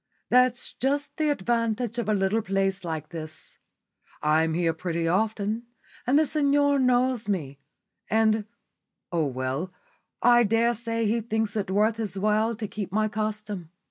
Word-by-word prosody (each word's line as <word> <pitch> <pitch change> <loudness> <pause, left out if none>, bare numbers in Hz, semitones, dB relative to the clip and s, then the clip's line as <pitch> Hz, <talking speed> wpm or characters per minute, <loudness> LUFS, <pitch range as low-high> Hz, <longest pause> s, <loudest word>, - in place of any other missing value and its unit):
"That's 250 0 +3
just 285 +3 -1
the 310 -1 +1
advantage 235 -1 0
of 230 - -2
a - - +3
little 195 +3 +1
place 195 -1 0
like 160 -3 -4
this. 155 -2 -8 0.6
I'm 160 +1 +2
here 170 -1 +1
pretty 165 0 -2
often, 215 +4 0 0.4
and 265 +3 +4
the 310 - +4
signor 285 -1 +2
knows 250 -3 +2
me; 145 -8 -2 0.5
and 220 -1 +2 0.7
oh, 165 -4 +1
well, 130 +7 -3 0.5
I 240 0 +6
daresay 230 +1 +1
he 225 +2 +1
thinks 220 -1 -2
it 200 -3 -2
worth 210 +3 +2
his 205 -4 -4
while 215 +3 +1
to 215 0 -4
keep 200 -2 -5
my 215 +2 +1
custom. 210 -5 -4
215 Hz, 145 wpm, -26 LUFS, 185-235 Hz, 0.7 s, I